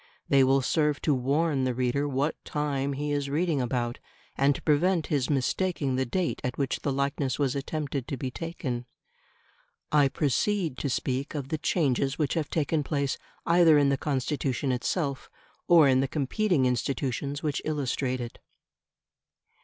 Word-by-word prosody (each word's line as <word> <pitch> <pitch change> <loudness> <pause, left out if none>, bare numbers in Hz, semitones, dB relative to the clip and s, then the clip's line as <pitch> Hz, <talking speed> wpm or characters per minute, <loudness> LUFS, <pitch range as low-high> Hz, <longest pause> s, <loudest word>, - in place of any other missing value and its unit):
They 135 -1 +5
will 135 +1 +3
serve 150 0 +1
to 150 - +3
warn 140 +2 +1
the 130 -1 0
reader 130 +3 0
what 140 +2 0
time 140 -2 -1
he 145 +2 -3
is 145 -1 -1
reading 155 -1 +1
about, 120 -1 -2 0.4
and 140 +1 +3
to - - -7
prevent 165 +3 +2
his 135 -4 +1
mistaking 145 0 0
the 130 -1 0
date 180 +6 -1
at 125 0 -3
which 135 -2 -1
the 140 - -1
likeness 140 -1 -1
was 140 -3 0
attempted 140 -2 -3
to 140 - -3
be 130 0 -4
taken. 130 -7 -4 1.0
I 145 -2 +5
proceed 155 - 0
to 140 - -1
speak 135 +3 -2
of 140 -2 -4
the 155 -1 -2
changes 140 -4 +1
which 150 -4 0
have 160 -3 -1
taken 155 0 0
place 140 -1 -1 0.3
either 170 -2 +6
in 145 -1 +4
the 140 - +3
Constitution 135 -1 -1
itself 140 +3 -2 0.4
or 165 -4 +7
in 130 -1 +4
the 135 - +1
competing 150 - +1
institutions 140 +3 -1
which 150 -2 -1
illustrate 135 -4 -1
it. 120 -1 -7
140 Hz, 160 wpm, -27 LUFS, 130-150 Hz, 1.0 s, or